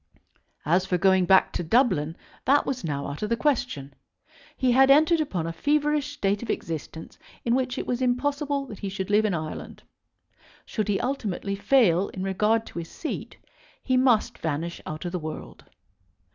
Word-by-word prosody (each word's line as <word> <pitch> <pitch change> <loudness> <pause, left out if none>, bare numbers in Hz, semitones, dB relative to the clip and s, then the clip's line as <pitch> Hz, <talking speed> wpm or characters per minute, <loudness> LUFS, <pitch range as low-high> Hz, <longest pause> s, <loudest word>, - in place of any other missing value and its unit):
As 175 +5 +3
for 180 - +1
going 190 0 +4
back 190 +1 +4
to - - -2
Dublin, 170 - +2 0.3
that 285 +2 +4
was 260 -5 -3
now 140 -3 -3
out 140 +1 -6
of 210 - -2
the 230 - +1
question. 145 - -1 0.6
He 255 -1 +2
had 265 +2 +5
entered 315 +4 +5
upon 185 - -2
a 165 - -3
feverish 295 - +1
state 200 -5 0
of 235 - -7
existence 160 0 -5 0.3
in 235 - +2
which 255 0 0
it - - -3
was 245 +1 -2
impossible 280 +3 0
that 210 -7 -10
he 200 - -4
should 190 0 -4
live 215 +1 +4
in 200 -4 +1
Ireland. 155 -1 -6 0.8
Should 215 -2 -2
he 205 -2 +1
ultimately 215 -7 -2
fail 200 -5 +3
in 185 - -6
regard 210 +4 +1
to - - -7
his 165 - -7
seat 315 - -6 0.5
he 255 - +1
must 255 -4 +2
vanish 165 +2 -3
out 155 +4 -6
of 175 - -3
the 180 - -2
world. 155 -1 -8
210 Hz, 180 wpm, -26 LUFS, 170-260 Hz, 0.8 s, had